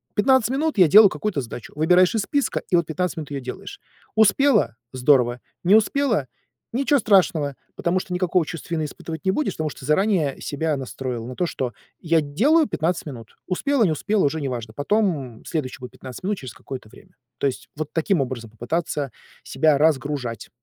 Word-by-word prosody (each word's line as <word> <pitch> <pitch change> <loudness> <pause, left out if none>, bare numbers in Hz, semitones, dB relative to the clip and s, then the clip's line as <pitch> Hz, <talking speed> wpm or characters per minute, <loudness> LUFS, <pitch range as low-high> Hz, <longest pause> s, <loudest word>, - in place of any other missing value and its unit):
15 250 +2 +3
минут 295 0 0
я 180 -4 +7
делаю 205 +4 +8
какую-то 195 -9 -2
задачу. 120 -1 -9
Выбираешь 180 +7 +4
из 220 - +2
списка, 285 +6 -1
и - - +3
вот 170 - +1
15 180 +2 -2
минут 155 -3 -6
ее 140 -1 -3
делаешь. 130 - -8 0.3
Успела- 220 - +4 0.2
здорово. 125 -2 +3 0.2
Не 195 +4 +6
успела- 220 - +2 0.5
ниче 275 +2 +2
страшного, 175 -9 +2 0.2
потому 180 +2 0
что 180 - -6
никакого 180 -2 +1
чувства 165 +1 -5
вины 155 -1 -1
испытывать 160 +1 -7
не 190 - +3
будешь, 300 +10 -1
потому 155 -1 -2
что - - -11
ты 130 - -9
заранее 155 -3 +1
себя 155 +1 -1
настроил 130 -3 -5
на 125 - -7
то, 180 - 0
что: 125 -6 -3 0.3
"Я 165 -2 +2
делаю 275 - +3
15 170 +2 -1
минут". 120 -7 -10
Успела, 250 +7 +1
не 180 - +3
успела- 200 +5 +1
уже 155 +2 -1
неважно. 120 -5 -4
Потом 145 - -1
следующие 150 -6 -3
будут 125 0 -9
15 130 +3 -10
минут 200 0 -1
через 130 -4 -8
какое-то 130 -5 -9
время. - - -18 0.2
То 140 - +2
есть 130 - -5
вот 155 0 -5
таким 165 -1 +1
образом 120 -4 -4
попытаться 140 +4 -3 0.3
себя 145 +2 +2
разгружать. 140 -6 0
160 Hz, 185 wpm, -23 LUFS, 135-195 Hz, 0.5 s, делаю